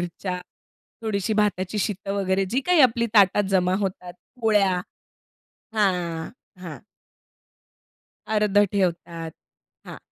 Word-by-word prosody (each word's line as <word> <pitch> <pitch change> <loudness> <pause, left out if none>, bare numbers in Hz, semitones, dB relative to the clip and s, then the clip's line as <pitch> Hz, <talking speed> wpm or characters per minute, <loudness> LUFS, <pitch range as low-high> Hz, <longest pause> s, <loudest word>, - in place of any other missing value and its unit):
मिरच्या, 180 +1 -4 0.6
थोडीशी 215 0 -1
भाताची 205 -1 0
शीतं 195 -1 -2
वगैरे 195 -1 0
जी 260 +4 +1
काही 360 -3 +4
आपली 235 -2 +4
ताटात 205 0 +5
जमा 185 -1 +2
होतात, 180 -2 -4 0.3
पोळ्या. 200 -5 +2 0.9
हां, 175 -6 0 0.3
हां. 165 -4 -7 1.5
अर्धं 210 -1 +3
ठेवतात. 170 -4 -2 0.5
हां. - - -9
195 Hz, 100 wpm, -24 LUFS, 180-210 Hz, 1.5 s, ताटात